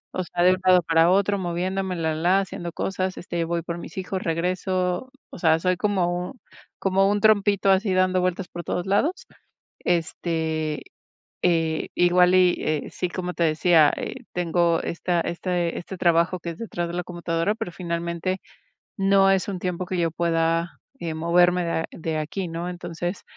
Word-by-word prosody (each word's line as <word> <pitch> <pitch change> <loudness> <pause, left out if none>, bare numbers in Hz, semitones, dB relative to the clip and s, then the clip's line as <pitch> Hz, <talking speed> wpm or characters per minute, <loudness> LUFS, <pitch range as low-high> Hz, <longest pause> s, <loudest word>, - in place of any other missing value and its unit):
O 185 - -1
sea, 175 0 -1
de 180 - +6
un 185 - 0
lado 185 -1 +6
para 165 +1 +4
otro, 200 +1 +2
moviéndome, 185 +1 -2
la 160 -1 -1
la, 175 +5 +3
haciendo 175 -3 -6
cosas, 185 +1 -2
este, 170 -1 -3
voy 170 0 -2
por 170 +1 -5
mis 165 - -10
hijos, 190 0 -3
regreso. 180 +5 -1 0.2
O - - -9
sea, 160 -2 +4
soy 185 +1 +1
como 180 +1 -1 0.4
como 195 +1 +2
un 205 - +1
trompito, 205 -2 +4
así 190 0 +2
dando 185 0 +3
vueltas 185 +1 -1
por 175 - -7
todos 175 +2 -2
lados. 275 - 0 0.5
Este, 160 -2 -1 0.6
eh, 165 -3 +1
igual 180 +1 +4
y 180 -1 +5
eh, 155 -2 -2
sí, 180 - -3
como 180 0 -4
te 170 - +1
decía, 155 -1 +4
eh, - - -5 0.2
tengo 170 -1 +1
esta 170 +1 -1
este 175 0 -2
este 190 +2 -7
trabajo 170 +1 +2
que 170 - -5
es 165 - -9
detrás 175 -7 -4
de 170 - -6
la 180 0 -2
computadora, 175 +2 -1
pero 180 - -5
finalmente 170 +1 -3 0.6
no 195 0 +4
es 190 0 +1
un 190 -3 -4
tiempo 180 0 -3
que 185 0 -3
yo 165 -2 +1
pueda, 165 0 0 0.2
eh, 165 -2 -3
moverme 175 +2 +3
de, 170 - -2
ah, 160 - -1
de 160 -1 -3
aquí, 165 +4 -3
¿no? 170 +2 -4
Entonces, 175 +1 -5
175 Hz, 175 wpm, -24 LUFS, 170-185 Hz, 0.6 s, de